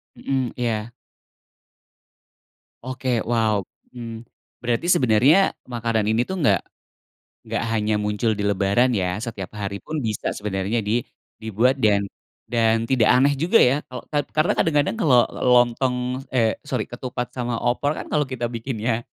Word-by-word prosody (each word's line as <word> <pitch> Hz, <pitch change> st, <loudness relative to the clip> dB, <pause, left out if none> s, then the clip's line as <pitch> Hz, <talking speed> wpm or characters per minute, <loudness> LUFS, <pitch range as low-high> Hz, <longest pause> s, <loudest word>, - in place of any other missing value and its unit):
Mhm. 130 Hz, -3 st, -2 dB
Iya. 115 Hz, -2 st, -2 dB, 1.9 s
Oke, 130 Hz, 0 st, -4 dB, 0.2 s
wow! 110 Hz, -3 st, +2 dB, 0.3 s
Mmm. 115 Hz, -2 st, -8 dB, 0.4 s
Berarti 120 Hz, +5 st, -1 dB
sebenarnya 125 Hz, -, +4 dB, 0.3 s
makanan 115 Hz, -3 st, -1 dB
ini 110 Hz, +2 st, +2 dB
tuh 190 Hz, -, -2 dB
nggak 145 Hz, -, +4 dB, 0.9 s
nggak -, -, -2 dB
hanya 110 Hz, -1 st, 0 dB
muncul 105 Hz, +2 st, 0 dB
di -, -, -1 dB
lebaran, 100 Hz, +5 st, +2 dB
ya. 90 Hz, 0 st, -1 dB
Setiap 100 Hz, -6 st, -6 dB
hari 100 Hz, 0 st, -5 dB
pun 155 Hz, 0 st, -4 dB
bisa 110 Hz, -5 st, -2 dB
sebenarnya 100 Hz, +2 st, -2 dB
di 115 Hz, +3 st, +1 dB, 0.4 s
dibuat, 110 Hz, +4 st, +2 dB
dan 100 Hz, -2 st, +3 dB, 0.4 s
dan 115 Hz, -1 st, +1 dB
tidak 125 Hz, -5 st, +4 dB
aneh 140 Hz, +3 st, +4 dB
juga 175 Hz, +9 st, +4 dB
ya 125 Hz, +2 st, +5 dB
kalo 125 Hz, -1 st, -7 dB
kad 145 Hz, -1 st, 0 dB
karena 155 Hz, +2 st, +3 dB
kadang-kadang 150 Hz, +4 st, +1 dB
kalau 130 Hz, -, +5 dB, 0.3 s
lontong 125 Hz, +1 st, +3 dB, 0.4 s
eh, 115 Hz, -3 st, +2 dB
sorry, -, -, -1 dB
ketupat 125 Hz, -1 st, -5 dB
sama 120 Hz, -1 st, -3 dB
opor 125 Hz, +4 st, +1 dB
kan -, -, -7 dB
kalau 150 Hz, -1 st, +2 dB
kita 120 Hz, -3 st, -3 dB
bikinnya 115 Hz, -1 st, -3 dB
120 Hz, 140 wpm, -23 LUFS, 110-130 Hz, 1.9 s, ya